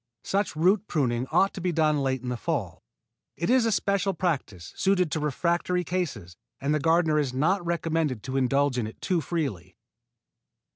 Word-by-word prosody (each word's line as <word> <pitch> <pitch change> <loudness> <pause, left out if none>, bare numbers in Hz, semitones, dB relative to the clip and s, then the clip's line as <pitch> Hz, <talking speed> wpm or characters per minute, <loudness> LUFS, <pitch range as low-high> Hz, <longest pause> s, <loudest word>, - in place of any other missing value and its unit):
Such 200 -3 -1
root 185 +7 +2
pruning 125 -5 0
ought 190 +4 +3
to 190 - -7
be 180 0 0
done 155 -2 +2
late 130 -2 -1
in 125 - -3
the 125 - -1
fall. 115 - -3 0.6
It 170 +8 0
is 250 -3 +4
a - - +1
special 200 -1 0
practice, 135 - -3
suited 185 -4 +2
to 160 - -1
refractory 170 +4 0
cases, 145 - -3 0.2
and 140 +2 0
the 150 - +1
gardener 160 0 +3
is 135 -4 -1
not 175 +8 +1
recommended 165 -7 -1
to 130 0 -5
indulge 135 0 +2
in 110 - -1
it 110 - -11
too 180 -4 0
freely. 120 - -4
155 Hz, 180 wpm, -26 LUFS, 130-180 Hz, 0.6 s, is